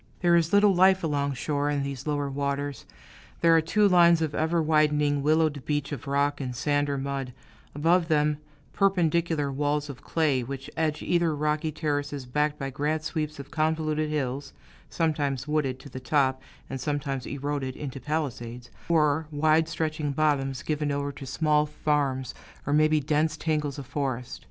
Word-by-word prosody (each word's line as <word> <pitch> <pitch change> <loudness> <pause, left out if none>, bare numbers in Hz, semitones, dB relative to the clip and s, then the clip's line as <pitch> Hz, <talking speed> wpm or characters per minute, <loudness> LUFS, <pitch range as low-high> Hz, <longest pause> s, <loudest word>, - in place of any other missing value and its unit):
There 175 -1 +4
is 170 -1 +2
little 205 0 +5
life 190 +1 +4
along 140 -3 0
shore, 145 +3 -1
in 145 -1 0
these 140 0 -5
lower 145 -1 0
waters. 140 -1 -3 0.5
There 165 -1 +6
are 165 - +5
two 205 +6 +3
lines 170 -3 +6
of 160 -2 -1
ever 160 +3 +1
widening, 150 -2 +2
willowed 155 -1 +2
beach 145 -1 -2
of 145 - -6
rock 140 +1 +1
and 125 -2 -4
sand 145 +2 0
or 140 - -1
mud; 135 -2 -4 0.4
above 165 +3 +3
them, 150 -2 +2 0.3
perpendicular 170 -6 +1
walls 145 +1 -1
of 130 - -13
clay, 150 -6 +1
which 135 +2 -7
edge 155 -2 -1
either 170 -3 +1
rocky 150 +1 0
terraces 145 -3 -2
backed 150 +4 0
by 135 -2 -4
grand 150 +3 -1
sweeps 155 -2 -3
of 140 0 -9
convoluted 155 -1 0
hills, 140 -2 -3 0.4
sometimes 145 -4 -1
wooded 150 -4 0
to - - -11
the 130 - -7
top, 130 0 +1 0.3
and 135 -1 -5
sometimes 140 -2 -2
eroded 140 -2 -3
into 135 -2 -6
palisades, 125 -4 -4 0.2
or 155 -2 +2
wide 155 +1 +2
stretching 155 -3 -2
bottoms 135 -3 0
given 150 -1 -1
over 140 0 -2
to 135 -1 -9
small 150 +2 +2
farms 145 -4 -1 0.3
or 145 - 0
maybe 155 +1 +4
dense 155 +2 0
tangles 150 -3 -1
of 140 - -6
forest. 130 -2 -3
150 Hz, 165 wpm, -27 LUFS, 140-155 Hz, 0.5 s, There